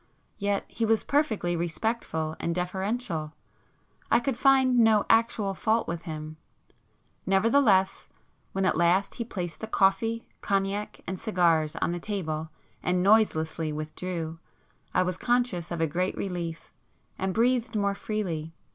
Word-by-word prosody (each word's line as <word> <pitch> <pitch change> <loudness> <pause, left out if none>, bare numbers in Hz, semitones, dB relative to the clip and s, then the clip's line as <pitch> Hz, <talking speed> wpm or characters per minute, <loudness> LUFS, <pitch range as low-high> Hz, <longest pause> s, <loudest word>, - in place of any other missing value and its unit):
Yet 200 -1 0
he 230 - -4
was 225 0 +2
perfectly 220 - +1
respectful 165 -2 -2
and 170 - -1
deferential; 180 -3 -2 0.8
I - - +5
could 260 +1 -1
find 260 -1 +4
no 220 -2 +5
actual 225 -3 +2
fault 220 +4 +1
with 170 -1 -3
him,—nevertheless 190 - -1 0.4
when 195 0 0
at - - +2
last 175 +4 +2
he 235 - -4
placed 180 -7 -5
the 220 - -4
coffee, 225 +3 +2 0.2
cognac, 195 +1 -1
and 185 -1 -4
cigars 165 -6 +2
on - - 0
the 175 - -3
table 160 -6 -3 0.3
and 180 - 0
[p 180 - +1
59] 200 +3 +7
noiselessly 160 -7 +1
withdrew, 160 +1 -5 0.5
I - - +3
was 180 0 -3
conscious 240 -9 0
of 170 -1 -3
a - - +4
great 180 +5 -1
relief, 175 -4 -5 0.5
and 190 0 0
breathed 235 +2 +1
more 200 -1 +1
freely. 175 -7 -4
190 Hz, 140 wpm, -27 LUFS, 170-220 Hz, 0.8 s, 59